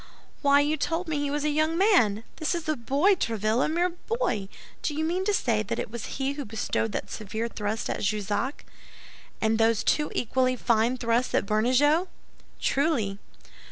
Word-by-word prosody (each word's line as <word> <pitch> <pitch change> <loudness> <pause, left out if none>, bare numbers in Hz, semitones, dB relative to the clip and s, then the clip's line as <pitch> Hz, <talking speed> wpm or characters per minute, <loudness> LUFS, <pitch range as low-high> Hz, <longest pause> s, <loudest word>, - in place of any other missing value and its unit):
"Why, 285 0 +5
you 300 +2 +1
told 330 +4 -1
me 305 -2 -1
he 290 0 -1
was 290 +1 -1
a - - +2
young 310 +2 +1
man? 245 - +4
This 315 +2 -1
is 335 -2 -5
a 310 - +1
boy, 280 - +2
Tréville, 225 - 0
a - - 0
mere 345 +3 +1
boy! 350 - -2 0.3
Do 295 - -2
you 315 - -1
mean 355 +3 0
to 415 - +2
say 235 - +1
that - - -3
it - - -4
was 235 -2 -6
he 270 0 0
who 285 0 -5
bestowed 220 0 -2
that - - -4
severe 220 +2 -4
thrust 215 -1 -3
at - - -3
Jussac?" 210 +5 -2 0.8
"And 220 0 +2
those 225 -1 +3
two 300 -1 +1
equally 255 +2 +1
fine 235 +1 +1
thrusts 235 +1 0
at - - +2
Bernajoux." 260 - +3 0.5
"Truly!" 255 -10 0
260 Hz, 185 wpm, -27 LUFS, 220-310 Hz, 0.8 s, Why